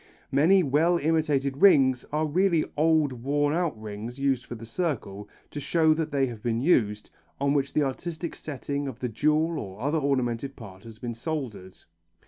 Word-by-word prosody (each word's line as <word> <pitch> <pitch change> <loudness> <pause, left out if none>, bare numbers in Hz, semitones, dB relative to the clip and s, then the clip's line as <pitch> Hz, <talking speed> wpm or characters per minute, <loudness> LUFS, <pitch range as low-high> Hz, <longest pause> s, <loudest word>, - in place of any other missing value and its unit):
Many 170 +8 +5
well 160 +5 +3
imitated 150 -4 0
rings 135 -8 +5
are 155 +1 0
really 170 +1 +2
old 155 -2 +3
worn 145 +4 0
out 165 -9 -1
rings 110 +3 -7
used 135 -3 0
for 120 - -6
the 115 0 -9
circle, 110 - -3 0.2
to 145 - -5
show 160 +1 +3
that 155 0 -2
they 140 -3 +1
have 120 -4 -7
been 115 0 -1
used, 110 -8 +1 0.3
on 140 0 +1
which 140 -1 0
the 150 - +2
artistic 160 +5 -4
setting 140 -1 -4
of 130 -4 -6
the 125 -1 -3
jewel 155 +7 +1
or 95 -2 -8
other 145 +5 0
ornamental 130 -3 0
part 100 -7 -13
has 115 -1 -11
been 120 +1 -5
soldered. 115 - -5
140 Hz, 175 wpm, -26 LUFS, 120-155 Hz, 0.3 s, Many